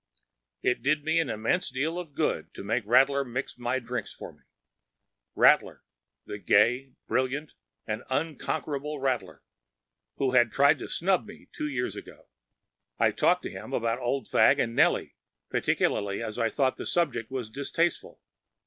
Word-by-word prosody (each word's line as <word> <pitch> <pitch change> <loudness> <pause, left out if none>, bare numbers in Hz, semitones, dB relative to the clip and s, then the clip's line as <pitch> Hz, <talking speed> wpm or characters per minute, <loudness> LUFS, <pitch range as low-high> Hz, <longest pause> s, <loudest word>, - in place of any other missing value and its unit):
It 125 - +1
did 150 +3 +1
me 160 +2 +2
an 160 -5 0
immense 115 +12 0
deal 150 +7 -2
of 160 -5 -9
good - - -1
to - - -7
make 110 +1 -1
Rattler 135 +4 +4
mix 125 0 -5
my 120 +2 0
drinks 120 -3 -4
for - - -10
me,‚ÄĒRattler! 60 0 -1 0.4
the 105 - -7
gay, 125 +7 +2
brilliant, 135 +4 -1 0.3
and 110 +1 -3
unconquerable 150 0 -2
Rattler, 135 -2 -2 0.7
who 135 -2 0
had 120 -2 +4
tried 140 +1 +4
to - - -6
snub 190 +4 +1
me 210 - -13
two 150 - -4
years 125 -3 -2
ago! - - -11 0.7
I - - +3
talked - - +2
to - - -5
him - - -8
about 115 +1 0
Old 125 -1 -2
Fagg - - +5
and 115 0 -1
Nellie, - - +2 0.3
particularly 100 +2 0
as 110 +1 -5
I 115 -1 +2
thought 130 +2 0
the - - -5
subject 145 -10 0
was 125 -5 -5
distasteful. 155 +6 -2
130 Hz, 155 wpm, -28 LUFS, 115-145 Hz, 0.7 s, Fagg